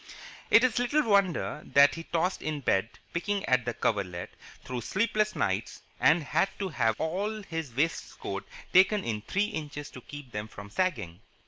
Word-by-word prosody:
It 230 - +7
is 245 -2 +3
little 290 +5 +2
wonder 200 -7 +2
that 140 0 +5
he 165 0 -7
tossed 180 +3 0
in 155 -2 -3
bed, 110 -3 +1 0.2
picking 200 +3 -1
at 130 -2 +2
the 120 - -2
coverlet, 90 -5 -1 0.3
through 125 -1 -4
sleepless 215 - 0
nights, 95 +4 -1 0.2
and 160 +1 +4
had 190 +7 +1
to 195 -2 -2
have 115 -8 +1
all 200 +6 -2
his 160 -9 -5
waistcoats 165 +5 -2 0.2
taken 195 +2 +5
in 110 -2 -2
three 200 - 0
inches 145 -5 -6
to 125 - -10
keep 145 -1 -10
them 105 0 -4
from 100 -1 -11
sagging. 130 - -1
155 Hz, 165 wpm, -29 LUFS, 120-195 Hz, 0.3 s, It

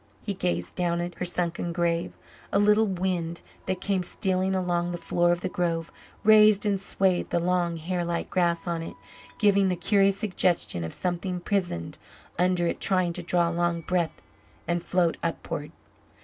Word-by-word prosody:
He 205 - -1
gazed 90 - -2
down 170 -1 0
at 175 +1 -3
her 180 - -1
sunken 175 -1 -1
grave; 170 0 -1 0.3
a - - +2
little 210 +2 +4
wind, 180 -3 -2 0.3
that 185 - -2
came 195 -2 0
stealing 190 +1 -1
along 175 -2 0
the 175 - -3
floor 175 0 +1
of 175 0 0
the - - -1
grove, 170 -2 -2 0.3
raised 215 -1 +6
and 200 -2 +1
swayed 190 -2 0
the 170 - +1
long, 175 -1 0
hair 175 +2 -2
like 170 0 -2
grass 170 -2 +1
on 170 -2 -2
it, 165 - -7 0.4
giving 200 -2 +4
the 180 - +1
curious 195 +2 +2
suggestion 180 - 0
of 80 - -4
something 180 0 -2
prisoned 175 - -2 0.4
under 180 -1 +2
it 170 - -1
trying 185 -3 +1
to 180 - -5
draw 170 0 +1
a - - -4
long 170 0 0
breath 170 0 -1 0.4
and 170 0 0
float 175 -2 +1
upward. 155 -2 -4
175 Hz, 175 wpm, -26 LUFS, 170-190 Hz, 0.4 s, raised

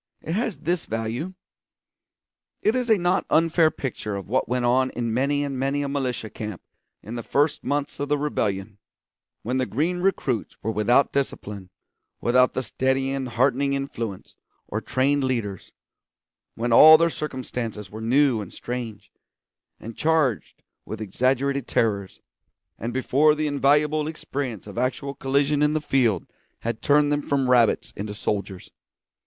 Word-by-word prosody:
It 160 - -5
has 220 +2 -1
this 175 +1 -2
value: 115 +11 -3 1.3
it 215 - +3
is 250 -1 -1
a 220 - +5
not 180 +1 +1
unfair 165 0 +4
picture 115 -8 -5
of 100 - -6
what 130 +5 0
went 125 0 0
on 130 +2 +3
in 120 -3 -3
many 140 +4 +1
and 135 -2 -3
many 140 +2 0
a - - -2
militia 130 -6 -3
camp 105 -4 -7 0.4
in 110 - -8
the 120 - -4
first 145 +5 0
months 145 0 -2
of 145 0 -3
the 145 - +2
rebellion, 105 -8 -2 0.6
when 125 +4 -1
the 130 -1 0
green 165 +8 -1
recruits 145 - -1
were 110 - 0
without 115 +6 +3
discipline, 105 -8 -3 0.5
without 125 +1 +3
the 130 - -1
steadying 130 +3 0
and 135 -2 -3
heartening 135 +3 +1
influence 115 -8 -5 0.3
or - - -3
trained 140 +2 +1
leaders; 115 -8 -3 0.8
when 115 +1 -1
all 155 +6 +10
their 170 +1 +2
circumstances 120 -9 -5
were 110 +1 -7
new 125 0 +3
and 100 - -8
strange, 120 -4 -6 0.7
and 115 0 -9
charged 155 -8 0 0.2
with 110 - -7
exaggerated 130 +5 0
terrors, 100 -4 -1 0.6
and 115 +3 -3
before 140 +4 +3
the 155 0 -1
invaluable 150 +1 +2
experience 135 - -5
of 105 +2 -6
actual 130 +2 -1
collision 140 +1 +1
in 150 0 +3
the 155 - +1
field 125 - +1 0.4
had 115 -1 -3
turned 145 0 +3
them 145 0 +1
from 140 -2 0
rabbits 120 -3 +3
into 105 +1 -5
soldiers. 100 -2 -4
130 Hz, 155 wpm, -24 LUFS, 115-145 Hz, 1.3 s, all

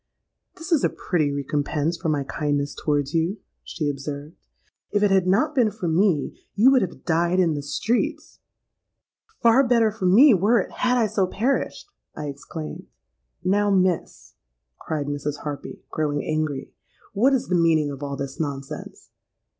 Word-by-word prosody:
—'This 350 0 -9
is 320 -4 +3
a - - +3
pretty 155 -6 -1
recompense 145 +3 -1
for 170 -1 -3
my 145 -2 0
kindness 145 0 -2
towards 145 -2 -1
you,' 165 +5 0 0.3
she 155 - -4
observed. 145 +2 -5 0.6
'If 205 0 +1
it 205 - +3
had 190 -2 +3
not 235 +12 +2
been 245 -6 +3
for 205 -3 -5
me, 165 -2 +1 0.2
you 230 +6 +6
would 260 -2 +4
have 180 - -5
died 175 +2 +2
in 170 -3 +3
the 145 - -3
streets.'—'Far 270 - -2
better 230 -2 +3
for 200 -3 -2
me 240 +9 +7
were 210 +5 +3
it, 185 - -3
had 250 0 +1
I 235 - +3
so 195 -2 0
perished!' 255 - -2 0.3
I 150 - -4
exclaimed.—'Now, 155 - -4
Miss,' 185 -3 0 0.5
cried 150 -2 -3
Mrs. 145 +1 -4
Harpy, 145 -2 -6
growing 145 -2 -1
angry, 155 -3 -2 0.4
'what 245 +7 +3
is 255 - -2
the 180 - +2
meaning 160 -3 +3
of 140 0 -8
all 140 -1 -4
this 135 0 -6
nonsense?' 140 -3 -6
170 Hz, 155 wpm, -24 LUFS, 145-215 Hz, 0.6 s, me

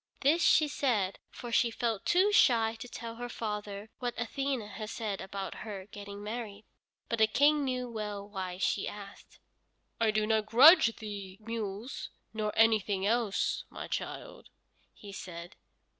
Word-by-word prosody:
This 305 +5 +4
she 310 - +5
said, 230 -10 0
for 240 - -8
she 235 0 +3
felt 230 -2 -2
too 375 +4 +4
shy 230 - +4
to 245 - -7
tell 230 -1 -7
her 245 0 -5
father 210 -2 -5
what 245 -2 -3
Athene 270 +2 -1
had 210 +1 -7
said 215 -4 -3
about 195 0 -5
her 200 -3 -6
getting 205 0 -8
married. 215 -1 -6 0.4
But 230 - -2
the 220 - +6
King 290 +5 +4
knew 255 -2 -2
well 210 -3 -5
why 190 -3 -5
she 185 - 0
asked. 200 -1 -10 0.6
"I 225 -1 +3
do 215 0 +1
not 215 -1 +1
grudge 265 +1 +8
thee 200 -3 -7
mules, 220 +1 -5 0.2
nor 215 -1 -1
anything 215 -3 +3
else, 225 -2 +1
my - - -7
child," - - -6 0.4
he 205 - -12
said. 175 -3 -8
220 Hz, 155 wpm, -31 LUFS, 205-240 Hz, 0.6 s, grudge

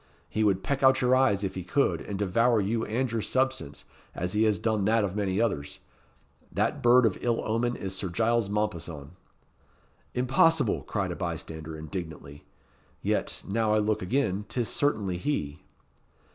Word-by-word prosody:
He 110 - -1
would 95 -2 +2
peck 140 -1 -1
out 130 0 +5
your 125 0 +4
eyes 105 -7 +3
if 95 - -2
he 95 - -5
could, 135 +10 +1
and 100 - -5
devour 115 +4 +2
you 110 +3 0
and 125 +2 -1
your 115 -1 -1
substance, 130 - -1 0.3
as 90 +1 -3
he 110 +1 +3
has 105 -2 +2
done 110 +1 0
that 110 +1 +3
of 100 -1 -2
many 100 -2 0
others. 75 -11 -1 0.7
That - - 0
bird 120 +1 +6
of 105 - 0
ill 120 -1 +1
omen 120 +2 0
is 95 -1 -4
Sir 95 0 -3
Giles 115 +3 +1
Mompesson." 85 -9 -3 1.0
"Impossible!" 130 +1 +3
cried - - -2
a - - -4
bystander, 80 0 -5
indignantly. 80 -2 -7 0.6
"Yet, - - -1
now 110 +1 +1
I - - +4
look 110 0 +1
again, 100 -1 0
'tis 120 -3 -1
certainly 105 -11 0
he." 80 - -2
105 Hz, 165 wpm, -28 LUFS, 95-120 Hz, 1.0 s, bird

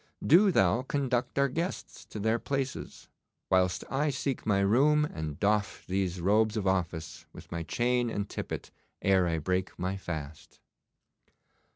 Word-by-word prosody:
'Do 190 +6 +6
thou 95 - +3
conduct 130 -3 -1
our 140 0 +4
guests 165 +7 -4
to - - -9
their 110 +3 +1
places, 135 0 -4 0.4
whilst 90 -1 +2
I 145 +3 0
seek 135 -2 -3
my 100 -2 +3
room 145 +9 +4
and 80 - -6
doff 105 0 0
these 95 -1 -1
robes 105 +4 +2
of 105 - -2
office, 85 -4 -2
with - - -13
my 85 - -3
chain 120 +6 0
and 100 -2 -3
tippet, - - -6 0.3
ere 95 -2 +4
I 80 -1 0
break 90 +4 -2
my 95 +2 -2
fast. 80 -5 -7
100 Hz, 150 wpm, -29 LUFS, 90-130 Hz, 0.4 s, Do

